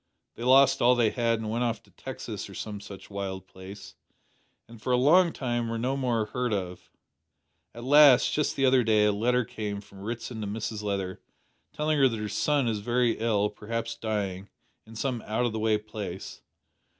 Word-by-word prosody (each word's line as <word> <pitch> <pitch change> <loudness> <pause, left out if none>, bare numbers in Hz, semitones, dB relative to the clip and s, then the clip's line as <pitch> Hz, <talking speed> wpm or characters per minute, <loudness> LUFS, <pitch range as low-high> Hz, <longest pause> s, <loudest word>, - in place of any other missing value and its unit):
They - - -12
lost 135 +2 +5
all 125 +1 +5
they 115 -3 +2
had 115 -2 +1
and 110 -1 -4
went 120 +2 0
off 115 -3 -2
to - - -24
Texas - - -7
or - - -11
some 105 -2 -6
such 100 0 -11
wild 95 -2 -5
place, 95 +2 -11 0.7
and 115 -1 -14
for 125 - -2
a 125 - +4
long 170 +7 +5
time 120 -4 -2
were 115 - -2
no 125 +4 -1
more 120 -5 0
heard 125 +3 -2
of. 90 -3 -4 0.9
At 120 - -8
last, 140 -1 +6
just 150 - 0
the 135 - +2
other 130 -1 +4
day, 110 -2 +3
a 105 - +4
letter 120 +4 +1
came 105 -2 -5
from 100 -1 -15
Ritson 115 +1 -5
to 105 - -3
Mrs 110 +1 -4
Leather, 100 -3 -3 0.5
telling 150 0 0
her 135 - +6
that 115 -3 -2
her 105 0 -4
son 140 +5 +1
is 110 -2 -1
very 120 +2 +1
ill 105 -2 +1
perhaps 115 +2 -4
dying 100 -4 -3 0.4
in 115 - -12
some 125 0 -2
out 110 +3 0
o' - - +1
the 110 0 -4
way 110 0 +2
place. 105 -3 -7
115 Hz, 200 wpm, -27 LUFS, 105-125 Hz, 0.9 s, last